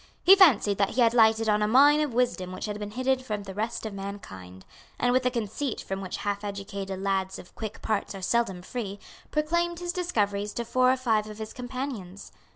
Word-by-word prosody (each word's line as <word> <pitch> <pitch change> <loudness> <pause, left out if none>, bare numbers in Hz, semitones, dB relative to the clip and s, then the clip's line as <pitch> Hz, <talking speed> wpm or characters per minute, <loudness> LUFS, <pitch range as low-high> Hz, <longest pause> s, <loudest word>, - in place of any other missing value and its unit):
He 385 - +9
fancied 240 - +5
that 200 -1 +3
he 250 - 0
had 230 -1 +5
lighted 225 -1 +4
on 210 0 +3
a 210 - +2
mine 285 +6 +6
of 300 -3 -1
wisdom 230 -7 0
which 185 - -5
had 210 -1 -4
been 210 -1 -5
hidden 255 +4 0
from 210 -5 -4
the 195 -1 -8
rest 220 +3 -3
of 215 - -5
mankind, 95 - -8 0.3
and, 245 - +2
with 255 - +4
the 250 - +1
conceit 235 +2 -3
from 195 0 -5
which 185 -2 -5
half 205 0 -3
educated 195 -1 -5
lads 190 -1 -1
of 180 - -13
quick 215 -2 -7
parts 210 -2 -1
are 195 - -7
seldom 195 -4 0
free, 205 -2 -5 0.3
proclaimed 340 +3 0
his 350 0 -3
discoveries 210 - -1
to 235 - -3
four 255 +2 +3
or 260 - +1
five 220 -4 +1
of 210 - -9
his 220 0 -7
companions. 245 -7 -6
215 Hz, 215 wpm, -27 LUFS, 200-255 Hz, 0.3 s, He